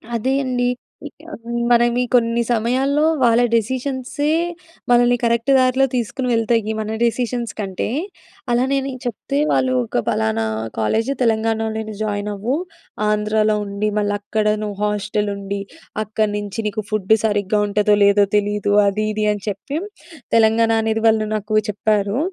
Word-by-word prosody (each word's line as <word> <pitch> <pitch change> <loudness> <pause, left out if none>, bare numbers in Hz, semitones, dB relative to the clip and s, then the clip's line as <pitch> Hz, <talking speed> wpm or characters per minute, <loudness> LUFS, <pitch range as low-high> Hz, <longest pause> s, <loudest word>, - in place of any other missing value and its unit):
అదే 260 +4 0
అండి. 245 -1 0 0.4
ఇంక - - -17 0.5
మనమీ 240 +1 +3
కొన్ని 235 0 +2
సమయాల్లో, 260 +6 +1 0.2
వాళ్ళ 235 -1 +4
డెసిషన్స్‌యే 260 +5 -1 0.6
మనల్ని 245 0 +5
కరెక్ట్ 235 +3 +2
దారిలో 260 +1 +3
తీసుకొని 250 +2 -2
వెళ్తాయి. 225 -1 +1
మన 220 +1 -3
డెసిషన్స్ 235 0 -1
కంటే. 190 -3 -3 0.6
అలానే 260 +3 +2
నేను 260 -2 -5
చెప్తే, 205 - -3
"వాళ్ళూ 130 -2 +2
ఒక 120 - -1
పలానా 110 0 0 0.3
కాలేజ్ 220 - 0
తెలంగాణలోనే 220 -1 0
జాయిన్ 205 -1 -2
అవ్వు. 230 +8 -1 0.5
ఆంధ్రాలో 215 0 +1
ఉండి, 200 +1 -2
మళ్ళ 205 -1 +1
అక్కడ 215 +1 -2 0.2
నువ్వు 205 -2 -5
హాస్టల్ 210 0 -1
ఉండి. 200 0 -4 0.4
అక్కడ 215 0 0
నించి 205 +1 -4
నీకు 210 +1 -3
ఫుడ్ 210 -3 -2 0.2
సరిగ్గా 205 -1 +1
ఉంటదో, 210 0 +3
లేదో 200 0 +5
తెలీదు. 205 0 +1
అది, 215 +2 0
ఇది 215 0 -1
అని 205 -2 -4
చెప్పి," 210 +9 -3 0.6
తెలంగాణ 225 0 +4
అనేది 225 0 -1
వాళ్ళు 220 -1 +3
నాకు 215 +1 -2
చెప్పారు. 210 +1 0
220 Hz, 135 wpm, -20 LUFS, 205-240 Hz, 0.6 s, మనల్ని